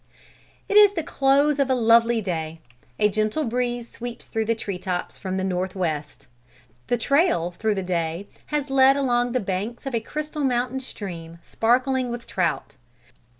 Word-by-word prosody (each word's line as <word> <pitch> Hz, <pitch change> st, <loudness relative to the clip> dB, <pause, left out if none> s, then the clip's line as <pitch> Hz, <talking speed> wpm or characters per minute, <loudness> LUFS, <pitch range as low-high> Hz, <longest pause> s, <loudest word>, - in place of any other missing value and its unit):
It 410 Hz, -, +3 dB
is 415 Hz, -1 st, +8 dB
the 330 Hz, -5 st, -2 dB
close 285 Hz, -1 st, +2 dB
of 275 Hz, -1 st, +2 dB
a 260 Hz, -, +3 dB
lovely 230 Hz, -1 st, +4 dB
day. 165 Hz, -4 st, -4 dB, 0.4 s
A 210 Hz, -, +4 dB
gentle 215 Hz, +7 st, 0 dB
breeze 240 Hz, -1 st, -2 dB
sweeps 240 Hz, 0 st, -8 dB
through 225 Hz, 0 st, -1 dB
the 230 Hz, +1 st, +1 dB
tree 200 Hz, -4 st, -5 dB
tops 180 Hz, -1 st, -3 dB
from 190 Hz, -1 st, -3 dB
the 190 Hz, -, -1 dB
north 185 Hz, 0 st, -2 dB
west. 155 Hz, -5 st, -3 dB, 0.6 s
The 245 Hz, -, +1 dB
trail 275 Hz, -, +2 dB
through 215 Hz, +4 st, -1 dB
the 190 Hz, -, -2 dB
day 170 Hz, +1 st, -2 dB, 0.2 s
has 295 Hz, -2 st, -2 dB
led 270 Hz, 0 st, +6 dB
along 245 Hz, -3 st, +1 dB
the 255 Hz, -, +2 dB
banks 205 Hz, +6 st, -4 dB
of 270 Hz, -, -4 dB
a 230 Hz, -, +2 dB
crystal 300 Hz, +5 st, -5 dB
mountain 250 Hz, 0 st, 0 dB
stream, 170 Hz, -10 st, -8 dB
sparkling 255 Hz, +2 st, +1 dB
with 240 Hz, 0 st, -5 dB
trout. 170 Hz, -4 st, -2 dB
230 Hz, 170 wpm, -24 LUFS, 190-265 Hz, 0.6 s, is